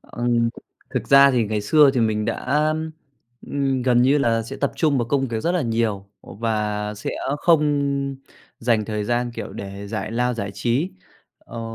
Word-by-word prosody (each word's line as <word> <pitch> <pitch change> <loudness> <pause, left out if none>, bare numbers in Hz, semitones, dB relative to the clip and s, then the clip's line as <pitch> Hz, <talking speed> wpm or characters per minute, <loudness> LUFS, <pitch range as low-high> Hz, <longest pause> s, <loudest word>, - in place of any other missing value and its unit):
Ừm, 120 -1 0 0.4
thực - - -3
ra 140 0 +8
thì 120 -3 +2
ngày 105 0 -2
xưa 145 +7 +5
thì 125 - +2
mình 110 -1 +1
đã, 150 +7 0 0.8
ừm, 135 -2 -1
gần 120 -1 +3
như 135 +4 +4
là 115 -4 +1
sẽ 115 - -8
tập 140 - -1
trung 150 -4 +2
vào 120 - -1
công 135 -2 +1
việc 115 -1 -2
rất 170 - 0
là 180 -4 +1
nhiều, 115 -4 -1 0.2
và 105 -1 -2
sẽ 105 - -5 0.3
không 140 -4 +1 0.4
dành 115 -2 +1
thời 105 -1 -3
gian, 120 +1 0
kiểu, - - -6
để 100 +1 -7
giải 105 0 -4
lao, 125 +1 0
giải 100 -3 -4
trí. 125 - 0 0.5
Ờ, 115 - -9
120 Hz, 180 wpm, -22 LUFS, 110-140 Hz, 0.8 s, ra